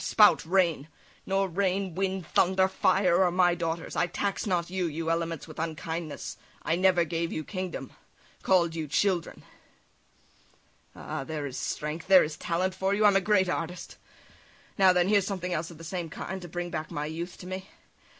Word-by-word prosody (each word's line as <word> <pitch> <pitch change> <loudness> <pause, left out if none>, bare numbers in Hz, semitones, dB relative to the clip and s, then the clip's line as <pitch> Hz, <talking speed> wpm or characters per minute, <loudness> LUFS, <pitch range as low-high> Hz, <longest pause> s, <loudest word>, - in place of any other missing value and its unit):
spout, 210 -6 +5
rain! 170 -5 +2 0.4
Nor 195 0 +1
rain, 190 0 -1
wind, 190 0 -2
thunder, 190 +3 +3
fire, 190 -1 +3
are 180 - +3
my 175 0 +3
daughters; 165 -1 -3
I - - +2
tax 200 +4 -2
not 175 -2 0
you, 185 -2 0
you 165 +1 -2
elements, 165 -2 -2
with 155 - -10
unkindness; 160 -1 -4 0.3
I 165 - +1
never 180 -1 +4
gave 165 +1 -2
you 155 - -3
kingdom, 185 -7 -5 0.5
call'd 175 -3 +3
you 160 -2 -4
children." 175 +3 0 1.5
Ah! - - -5
there 150 0 -4
is 135 -2 -5
strength, 150 +3 -4
there 190 -1 +8
is 150 0 -4
talent 175 +3 -1
for 190 +1 0
you! 210 +1 +2
I'm 205 -1 +6
a 195 - +4
great 190 -2 +3
artist! 175 0 -4 0.8
Now, 190 -1 +6
then, 180 0 +2
here's 200 -1 +3
something 180 -3 -3
else 165 0 -2
of 170 - -12
the 165 - -11
same 170 0 -4
kind, 190 +5 -6
to 175 - -8
bring 175 +1 -4
back 155 -1 -4
my 145 - -3
youth 170 +3 -5
to - - -11
me. 185 +1 -6
175 Hz, 180 wpm, -28 LUFS, 165-190 Hz, 1.5 s, there